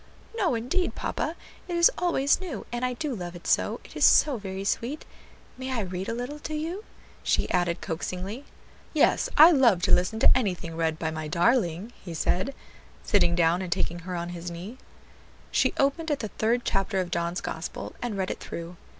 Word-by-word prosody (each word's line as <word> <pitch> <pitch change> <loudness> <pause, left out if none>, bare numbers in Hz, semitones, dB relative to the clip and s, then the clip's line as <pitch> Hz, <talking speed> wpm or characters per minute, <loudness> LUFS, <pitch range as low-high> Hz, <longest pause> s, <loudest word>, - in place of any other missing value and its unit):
"No, 380 - +1
indeed, 260 +11 -1
papa; 320 - -2 0.3
it 350 - -3
is 340 0 +6
always 330 -4 +2
new, 320 - -5
and 240 +1 -3
I 250 0 +1
do 285 +3 -3
love 175 -5 -6
it 175 - -11
so; - - +1
it - - -15
is - - -1
so 285 -5 +6
very 195 -2 -5
sweet. 240 +8 -2 0.5
May 260 0 -4
I 245 -3 0
read 185 -1 -4
a 230 - -2
little 250 +5 -5
to 310 +1 -5
you?" 335 +7 -3 0.4
she - - +1
added 175 -1 +1
coaxingly. 190 - -4 0.5
"Yes, - - +3
I 320 +4 +10
love 235 - +4
to - - +2
listen 180 +5 +3
to - - +7
anything 180 -9 -1
read 160 -1 0
by 160 0 -2
my 155 -1 -4
darling," 180 - +1
he 170 -3 -6
said, 185 - 0 0.5
sitting 175 -4 +3
down 170 +1 +3
and 185 -2 -5
taking 175 -1 -1
her 180 +1 -5
on 170 0 -3
his 175 0 -6
knee. 185 +9 -8 0.7
She - - +3
opened 280 +4 +1
at 295 - 0
the 215 - -4
third 235 +4 0
chapter 195 0 0
of 180 -1 -2
John's 170 +1 -1
Gospel 160 +1 -5
and 240 -4 -3
read 190 -1 -1
it - - -5
through. 170 +1 -7
200 Hz, 195 wpm, -27 LUFS, 175-265 Hz, 0.7 s, I